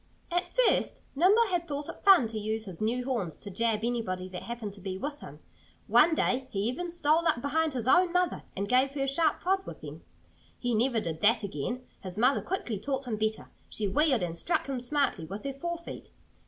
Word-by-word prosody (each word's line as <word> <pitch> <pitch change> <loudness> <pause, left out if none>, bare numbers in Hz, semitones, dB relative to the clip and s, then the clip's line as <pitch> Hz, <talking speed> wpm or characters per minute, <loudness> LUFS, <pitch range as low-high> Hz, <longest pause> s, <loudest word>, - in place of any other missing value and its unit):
At 350 +1 +1 0.2
first - - +1 0.2
Nimble 390 +10 +5
had 345 -1 0
thought 290 0 -4
it - - -9
fun 385 -10 +7
to 220 -1 -4
use 215 +1 -3
his 185 -3 -9
new 245 +3 0
horns 220 - -2
to 205 - -10
jab 220 +2 0
anybody 225 -6 -2
that 180 -1 -6
happened 235 -4 -6
to 200 - -13
be 190 0 -4
with 290 +7 -5
him. - - -10 0.5
One 320 +1 +5
day 260 -3 +1
he 195 - -2
even 255 - -2
stole 335 0 +2
up 235 - +2
behind 310 +3 0
his 245 -2 -3
own 355 +6 +5
mother 360 0 +1 0.2
and 200 +1 -1
gave 260 +4 +3
her 275 - 0
a - - -1
sharp 300 +5 +1
prod 380 +1 +1
with - - -8
them. - - -9 0.5
He 245 -1 -1
never 235 +1 +2
did 165 -5 -4
that 225 +1 +4
again. 200 - -4 0.2
His 185 -1 -7
mother 255 +5 +3
quickly 245 - -3
taught 270 +4 -3
him 225 -3 -3
better. 215 0 -2 0.2
She 210 - -1
wheeled 270 - +4
and 170 -1 -3
struck 330 - 0
him 270 -2 -3
smartly 250 - 0
with 195 +6 -7
her 275 -1 -3
fore 345 +5 -4
feet. 340 - -10
250 Hz, 220 wpm, -29 LUFS, 210-300 Hz, 0.5 s, fun